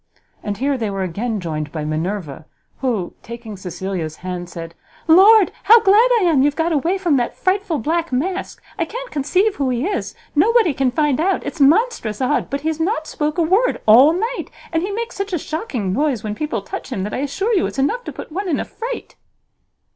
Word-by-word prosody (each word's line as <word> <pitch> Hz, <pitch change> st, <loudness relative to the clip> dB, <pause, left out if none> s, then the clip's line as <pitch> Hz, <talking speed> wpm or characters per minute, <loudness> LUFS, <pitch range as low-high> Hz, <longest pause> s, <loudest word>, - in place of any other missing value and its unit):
And 205 Hz, -2 st, -4 dB
here 275 Hz, +2 st, 0 dB
they 220 Hz, -2 st, -1 dB
were 195 Hz, -1 st, -2 dB
again 210 Hz, +5 st, -2 dB
joined 155 Hz, -4 st, -4 dB
by 155 Hz, -2 st, -4 dB
Minerva, 160 Hz, -1 st, -3 dB, 0.3 s
who, 230 Hz, -9 st, -1 dB
taking 235 Hz, -2 st, -8 dB
Cecilia's 180 Hz, -3 st, -5 dB
hand, 180 Hz, -1 st, -4 dB
said, 165 Hz, -1 st, -8 dB, 0.3 s
"Lord, 390 Hz, +5 st, +7 dB
how 460 Hz, +2 st, +8 dB
glad 435 Hz, +4 st, +5 dB
I -, -, 0 dB
am 320 Hz, -7 st, +3 dB
you've 290 Hz, +1 st, +2 dB
got 330 Hz, +1 st, 0 dB
away 330 Hz, +5 st, +1 dB
from 345 Hz, -7 st, +2 dB
that 240 Hz, -1 st, -2 dB
frightful 375 Hz, -3 st, 0 dB
black 330 Hz, +6 st, -1 dB
mask! 365 Hz, +10 st, -3 dB, 0.2 s
I 335 Hz, -, +1 dB
can't -, -, -7 dB
conceive 365 Hz, +9 st, +1 dB
who 275 Hz, -2 st, 0 dB
he 250 Hz, +3 st, -1 dB
is; 400 Hz, +1 st, -3 dB, 0.2 s
nobody 425 Hz, +1 st, +4 dB
can 270 Hz, -1 st, +1 dB
find 295 Hz, 0 st, +1 dB
out; 380 Hz, +4 st, 0 dB
it's 315 Hz, -, -5 dB
monstrous 305 Hz, -, +2 dB
odd, 265 Hz, +3 st, 0 dB
but 280 Hz, 0 st, -3 dB
he 315 Hz, -, -1 dB
has 320 Hz, 0 st, -3 dB
not 320 Hz, -2 st, 0 dB
spoke 300 Hz, +1 st, -2 dB
a 340 Hz, -, +3 dB
word 390 Hz, +10 st, +2 dB
all 250 Hz, +8 st, +7 dB
night, 450 Hz, +9 st, -2 dB, 0.2 s
and 325 Hz, -, +1 dB
he 380 Hz, -, -2 dB
makes 460 Hz, +3 st, -4 dB
such 395 Hz, -1 st, -4 dB
a -, -, +2 dB
shocking 275 Hz, -, -3 dB
noise 270 Hz, -3 st, 0 dB
when 215 Hz, -1 st, -3 dB
people 230 Hz, -4 st, -3 dB
touch -, -, -7 dB
him, 190 Hz, -, -2 dB
that 210 Hz, -, -4 dB
I -, -, -2 dB
assure 385 Hz, -, -1 dB
you 380 Hz, -, +2 dB
it's -, -, -8 dB
enough 435 Hz, -, 0 dB
to -, -, -5 dB
put -, -, -9 dB
one 380 Hz, +4 st, -3 dB
in 295 Hz, -, 0 dB
a -, -, -2 dB
fright." 480 Hz, +2 st, -7 dB
295 Hz, 215 wpm, -20 LUFS, -, 0.3 s, how